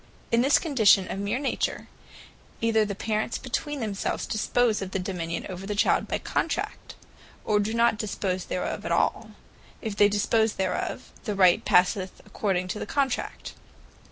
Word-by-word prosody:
In 230 0 +4
this 275 +3 +5
condition 220 - +4
of 195 - -4
meer 200 +4 -1
Nature, 275 0 -2 0.7
either 225 -1 +3
the 200 -1 -4
Parents 215 +2 -1
between 285 +2 -3
themselves 205 -3 -2
dispose 220 0 +1
of 195 - -4
the 190 - -2
dominion 175 -3 -4
over 190 +1 -7
the 210 - -2
Child 205 - +2
by - - -1
Contract; - - -3 0.5
or 210 -1 +2
do 205 +1 -1
not 230 -1 +2
dispose 190 -3 -2
thereof 180 - -3
at - - -4
all. - - +1 0.5
If 220 -3 -4
they 205 0 +5
dispose 220 +2 +2
thereof, 190 -1 -3
the 210 -3 -2
right 185 -2 +5
passeth 185 +1 +2
according 185 -3 -1
to 210 - -3
the - - -5
Contract. 275 -1 -2
210 Hz, 160 wpm, -26 LUFS, 190-230 Hz, 0.7 s, this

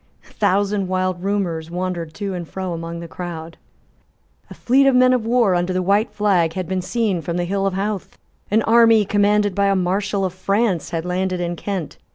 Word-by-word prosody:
A - - -20
thousand 200 -1 +1
wild 185 -1 -1
rumours 180 -5 -2
wandered 175 -2 -4
to 200 -2 -4
and 175 -3 -6
fro 190 -2 -4
among 165 0 -6
the 170 - -7
crowd. 165 -2 -7 0.9
A - - -10
fleet 270 +3 +3
of 270 - +4
men 255 0 +5
of 235 -3 -1
war 235 -5 +3
under 175 +1 0
the 185 0 0
white 200 +4 +2
flag 180 -6 +1
had 185 -1 -4
been 185 +1 -1
seen 210 -4 -1
from 170 +1 -3
the 175 - -1
hill 195 +2 0
of 190 - -2
Howth. 200 0 -3 0.3
An 220 +2 +2
army 225 -2 +5
commanded 205 0 +2
by 200 +1 +1
a 195 - +2
Marshal 195 +2 0
of 185 - -3
France 195 -1 0
had 165 -1 -3
landed 185 0 -1
in 175 0 -2
Kent. 185 -4 -5
190 Hz, 205 wpm, -20 LUFS, 175-205 Hz, 0.9 s, men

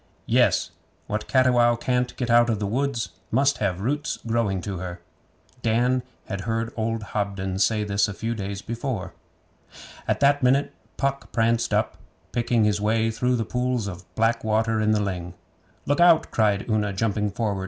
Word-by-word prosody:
'Yes. - - +2 0.3
"What 105 +1 -3
Cattiwow 125 -3 +4
can't 125 +1 -1
get 120 -2 -1
out 120 0 +5
of 110 - +1
the 105 - -2
woods 120 +2 -1 0.2
must 135 +4 +2
have 95 -3 -1
roots 145 +7 -1
growing 115 -4 0
to 95 -1 -5
her."' 90 -1 -6 0.6
Dan 120 +3 +2 0.2
had 100 -2 -4
heard 115 +1 -2
old 115 0 -2
Hobden 95 -2 -2
say 110 +1 +2
this 100 0 +1
a 105 - -5
few 115 +2 -2
days 100 -2 -5
before. 115 -4 -4 0.9
At - - +1
that 140 0 +4
minute 130 +3 +2 0.2
Puck 140 0 -2
pranced 115 0 +1
up, - - 0 0.3
picking 120 -1 +1
his 105 -1 +1
way 110 +1 +1
through 125 +3 0
the 115 -2 -1
pools 125 -2 -1
of 90 -2 -9
black 115 +1 +1
water 110 0 +1
in 110 - +2
the 105 -1 +2
ling. 90 -3 -4 0.5
'Look 145 - +1
out!' 170 -2 +5
cried 105 -3 +1
Una, 105 -3 0
jumping 105 +1 0
forward. 100 -1 -2
115 Hz, 170 wpm, -24 LUFS, 105-125 Hz, 0.9 s, out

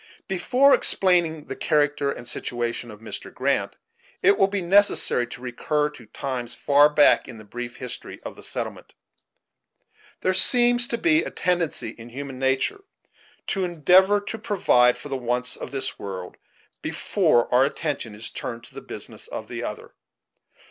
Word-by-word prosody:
Before 250 +9 +3
explaining 170 -5 +2
the - - -6
character 145 -1 +1
and 120 - -8
situation 120 0 -3
of 105 -1 -12
Mr. 115 - -7
Grant, - - -1 0.5
it 200 +2 +6
will 195 - +3
be 200 -1 -2
necessary 185 - +3
to 120 - -10
recur 150 +4 -1
to 120 -6 -14
times 125 -1 -4
far 145 +1 +5
back 150 -1 +5
in 120 - -9
the 110 - -11
brief 120 +3 -7
history 125 -2 -6
of - - -7
the - - -12
settlement. - - -5 1.3
There 185 - +1
seems 240 +5 +4
to 235 - -2
be 320 +3 +4
a - - -4
tendency 170 -9 -1
in 115 +1 -11
human 135 +1 -7
nature 135 - 0 0.6
to 195 - -1
endeavor 180 +4 +4
to 215 +2 -6
provide 125 - +3
for 145 - -9
the 135 - -2
wants 125 0 -1
of - - -7
this 135 -1 -3
world, 95 -2 -7 0.4
before 120 -1 +1
our 125 +2 +6
attention 140 -6 -3
is 110 - -6
turned 115 -1 -6
to - - -15
the - - -8
business - - -8
of - - -7
the - - -5
other. - - -6
140 Hz, 160 wpm, -24 LUFS, 120-185 Hz, 1.3 s, it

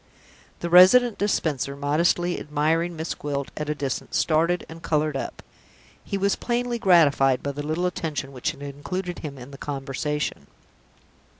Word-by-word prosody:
The 170 - -2
Resident 210 +6 +7
Dispenser, 145 -9 0
modestly 170 +5 +1
admiring 160 +3 0
Miss 160 +1 -3
Gwilt 140 -2 -4
at 150 -1 -4
a 150 - 0
distance, 140 -3 -3
started 165 +3 +2
and 165 +1 -11
colored 155 -2 0
up. - - -5 0.6
He 200 - -3
was 200 +1 +1
plainly 240 0 -2
gratified 145 - +4
by 140 - -1
the 145 +1 -5
little 160 +4 -1
attention 155 -6 -3
which 130 +2 -2
had 145 -2 -7
included 175 +6 -5
him 145 -3 -7
in 125 +2 -10
the 140 - -11
conversation. 145 +1 -3
155 Hz, 155 wpm, -24 LUFS, 140-175 Hz, 0.6 s, Resident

